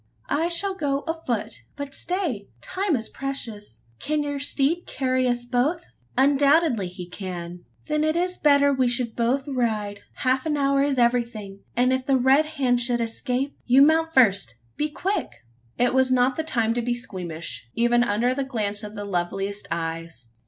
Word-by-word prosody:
"I 320 +3 +2
shall 385 +3 -2
go 285 -6 -1
afoot. 240 -10 -3
But 285 -1 -6
stay! 330 - -2
time 370 - -1
is 225 -3 -2
precious. 220 - -6 0.2
Can 305 0 0
your 285 -1 -3
steed 285 +4 0
carry 255 -1 0
us 240 0 -1
both?" 265 +8 0 0.3
"Undoubtedly 280 - +4
he 180 0 -8
can." 180 -2 -7 0.2
"Then 305 0 0
it 310 +1 +1
is 360 +1 0
better 285 -1 +5
we 260 -2 +2
should 240 -1 -1
both 250 +4 0
ride. 220 -6 -1 0.2
Half 260 +3 +1
an 300 -1 0
hour 275 -1 +2
is 280 -1 +1
everything; 235 -5 0 0.2
and 255 +2 +3
if 260 0 -2
the 270 -1 +4
Red 265 +5 +4
Hand 260 -6 +1
should 240 0 +1
escape 250 +4 -2
You 260 +3 +7
mount 320 +2 +3
first 200 - +3 0.2
be 300 +1 -1
quick!" 295 - -3 0.3
It 245 0 +2
was 260 0 +3
not 255 0 +3
the 320 - -2
time 230 -7 +1
to 240 - -1
be 240 +1 -1
squeamish 170 - -6
even 240 +1 +3
under 240 +3 +1
the 275 +1 -1
glance 210 -6 -2
of 210 0 -8
the 205 -1 -5
loveliest 195 +2 -2
eyes. 165 -6 -4
250 Hz, 175 wpm, -24 LUFS, 210-285 Hz, 0.3 s, You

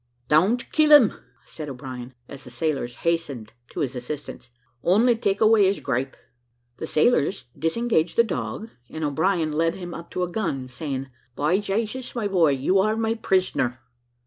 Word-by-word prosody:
"Don't 190 +11 +3
kill 310 -1 +4
him," 290 -8 +8 0.3
said 155 -2 -7
O'Brien, 130 -2 -8
as 140 0 -9
the 125 - -10
sailors 135 -3 -2
hastened 145 -10 -1 0.2
to 175 - -4
his 135 -3 -2
assistance; 125 0 -7 0.3
"only 225 - +4
take 200 -3 0
away 215 -2 +5
his 195 - 0
gripe." 130 +2 -2 0.6
The 160 - -5
sailors 155 - +2
disengaged 170 0 0
the 235 - +7
dog, 220 +1 -4 0.2
and 160 - -6
O'Brien 160 +2 +1
led 165 +3 +1
him 175 -2 -7
up 170 0 -9
to 180 - -1
a - - 0
gun, 155 -11 -2
saying, 135 0 -5 0.2
"By 155 +7 +2
Jasus, 220 +6 -3
my 225 -4 -1
boy, 180 -6 +3
you 140 +9 +2
are 215 +3 +2
my 225 0 +1
prisoner." 185 - 0
165 Hz, 165 wpm, -24 LUFS, 140-210 Hz, 0.6 s, him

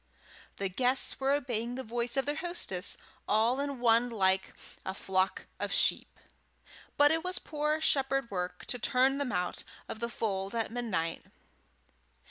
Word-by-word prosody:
The 200 - -1
guests 250 +7 +1
were 270 0 +1
obeying 245 -4 -1
the 260 - -4
voice 235 +2 -1
of 270 - +2
their 290 +1 -1
hostess 320 - -1 0.3
all 225 +5 +3
in 280 -2 -3
one 235 0 +4
like 190 -4 +1 0.3
a 190 - -4
flock 190 -1 0
of - - -2
sheep, - - +1 0.8
but 290 0 +7
it 325 0 +1
was 365 0 +2
poor 300 0 -1
shepherd 270 -5 +2
work 180 -1 -4
to 245 - -1
turn 265 +3 +2
them 280 -3 -1
out 180 0 -1 0.2
of 220 - -6
the 235 +1 -2
fold 195 -3 -2
at 225 -1 -1
midnight. 210 -9 -2
240 Hz, 155 wpm, -31 LUFS, 200-275 Hz, 0.8 s, but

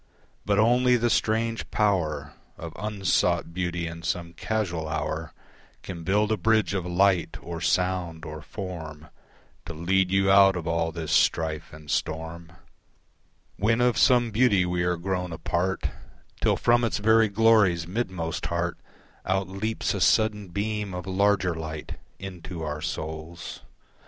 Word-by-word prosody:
But 100 -1 +2
only 125 +3 +4
the 120 0 +1
strange 115 +1 0
power 80 -9 0 0.2
Of 80 -1 -7
unsought 95 -5 0
Beauty 90 -1 -2
in 85 0 -6
some 85 0 -3
casual 85 -3 -2
hour 80 +1 -3 0.5
Can 85 -3 -7
build 105 +4 +2
a 110 - +2
bridge 110 +1 +2
of 90 -3 -2
light 90 -1 +2
or 85 -1 -7
sound 90 -3 0
or 75 0 -7
form 80 -7 -7 0.6
To - - -5
lead 90 +3 +1
you 95 +1 +3
out 95 -1 +7
of 85 -2 -4
all 85 -1 0
this 80 -2 -5
strife 80 -2 +1
and 75 -1 -9
storm; 80 +1 -3 1.1
When 115 +3 +2
of 125 -1 +3
some 120 -1 +4
beauty 105 -5 +3
we 90 0 -1
are 90 0 +1
grown 90 0 -2
a 80 - -5
part 90 +4 -1 0.6
Till - - +3
from 120 0 +3
its 115 - 0
very 110 +1 +4
glory's 100 -5 +4
midmost 90 -4 -3
heart 85 0 -2 0.4
Out 95 0 -1
leaps 110 +4 -2
a - - -3
sudden 105 -2 +3
beam 100 +1 -3
of 90 - -5
larger 95 -1 +2
light 80 -1 -6 0.2
Into 90 -3 -7
our 75 0 -4
souls. 80 +2 -6
90 Hz, 145 wpm, -26 LUFS, 85-105 Hz, 1.1 s, out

